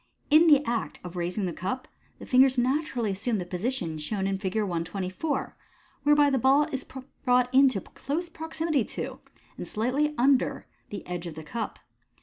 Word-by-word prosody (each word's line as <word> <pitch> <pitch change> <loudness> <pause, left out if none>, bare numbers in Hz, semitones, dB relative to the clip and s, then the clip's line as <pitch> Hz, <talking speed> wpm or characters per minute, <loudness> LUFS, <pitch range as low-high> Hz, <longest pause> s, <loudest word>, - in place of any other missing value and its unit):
In 315 +3 +7
the 295 -2 +6
act 235 -1 -2
of 180 0 -8
raising 180 +3 -2
the 175 - -2
cup, 255 +11 -4 0.3
the - - -10
fingers 260 0 +5
naturally 250 -3 0
assume 215 +4 -1
the 180 - -3
position 180 -3 -3
shown 190 +6 -2
in 195 0 -1
Fig. 190 -1 -3
124 190 - -2 0.5
whertby 295 0 +5
the 265 - +2
ball 270 +4 +5
is 265 -1 -2 0.4
brought 250 -1 +3
in 270 +1 +7
close 280 - -4
proximity 320 -4 -1
to, - - -6 0.4
and - - -6
slightly 270 +7 0
under, 265 +1 +2 0.2
the 205 - -7
edge 175 -1 -5
of 160 - -7
the 160 - -8
cup. 220 +8 -4
245 Hz, 165 wpm, -27 LUFS, 190-275 Hz, 0.5 s, In